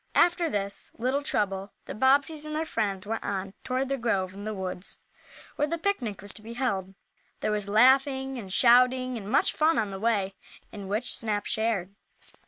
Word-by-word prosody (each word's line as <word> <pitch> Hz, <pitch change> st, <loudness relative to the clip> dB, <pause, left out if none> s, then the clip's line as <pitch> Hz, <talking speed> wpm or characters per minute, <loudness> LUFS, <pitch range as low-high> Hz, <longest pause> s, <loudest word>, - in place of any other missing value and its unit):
After 345 Hz, -1 st, +4 dB
this 200 Hz, -1 st, -2 dB
little 255 Hz, +4 st, 0 dB
trouble, 195 Hz, -7 st, -1 dB
the -, -, -6 dB
Bobbseys 285 Hz, +5 st, +2 dB
and 305 Hz, 0 st, -5 dB
their 315 Hz, +1 st, -1 dB
friends 205 Hz, -8 st, -2 dB
went 225 Hz, +2 st, -3 dB
on 195 Hz, -1 st, -3 dB
toward 260 Hz, +1 st, -1 dB
the 275 Hz, 0 st, -2 dB
grove 195 Hz, -6 st, 0 dB
in 200 Hz, +1 st, -8 dB
the 215 Hz, -, -2 dB
woods 185 Hz, -1 st, -4 dB, 0.6 s
where 295 Hz, -, +2 dB
the 335 Hz, +2 st, -2 dB
picnic 260 Hz, -, -2 dB
was 205 Hz, -, -5 dB
to -, -, -10 dB
be 225 Hz, +2 st, -8 dB
held. 195 Hz, -7 st, -2 dB, 0.5 s
There -, -, 0 dB
was 205 Hz, -1 st, -2 dB
laughing 265 Hz, +4 st, +4 dB
and 195 Hz, -4 st, -8 dB
shouting, 250 Hz, +3 st, +4 dB
and 205 Hz, -3 st, -6 dB
much -, -, +3 dB
fun 315 Hz, +2 st, +3 dB
on 210 Hz, -3 st, 0 dB
the 195 Hz, -, -6 dB
way, 200 Hz, -3 st, +1 dB, 0.4 s
in 200 Hz, -2 st, -8 dB
which 215 Hz, +5 st, 0 dB
Snap 210 Hz, -2 st, -1 dB
shared. 220 Hz, -4 st, -1 dB
225 Hz, 190 wpm, -27 LUFS, 200-265 Hz, 0.6 s, After